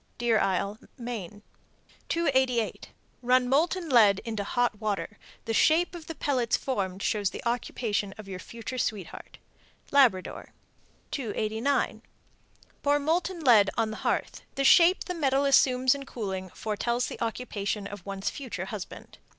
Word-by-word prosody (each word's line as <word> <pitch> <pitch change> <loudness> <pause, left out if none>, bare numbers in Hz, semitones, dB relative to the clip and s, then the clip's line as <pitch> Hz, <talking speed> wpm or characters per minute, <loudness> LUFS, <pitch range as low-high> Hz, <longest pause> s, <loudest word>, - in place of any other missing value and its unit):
Deer 235 -2 +2
Isle, 200 +3 0 0.2
Me. 215 -5 -6 0.7
288. 260 -8 +1 0.3
Run 250 0 +3
molten 335 +6 +1
lead 215 -8 +5
into 220 -3 -3
hot 240 0 0
water; 210 0 -3 0.3
the 225 - -2
shape 330 - +3
of 340 -2 -9
the 325 - -6
pellets 255 -6 +1
formed 195 -7 -3
shows 205 -3 +1
the - - -8
occupation 230 -4 -1
of 215 -2 -10
your 185 -2 -6
future 235 +5 -7
sweetheart. 205 -6 -4 0.5
Labrador. 245 -10 +2 0.6
289. 225 +1 -1 0.8
Pour 290 0 +3
molten 335 +4 -1
lead 225 -8 +6
on 220 -1 0
a - - -7
hearth; - - -2
the 275 - 0
shape 345 +6 +6
the 360 - -4
metal 280 -4 +1
assumes 260 -2 +4
in 280 -1 -6
cooling 190 -5 -4
foretells 235 +5 -2
the - - -7
occupation 215 -3 -3
of 205 -2 -8
one's 195 0 -3
future 200 -10 -5
husband. 200 -1 -8
235 Hz, 140 wpm, -28 LUFS, 205-275 Hz, 0.8 s, lead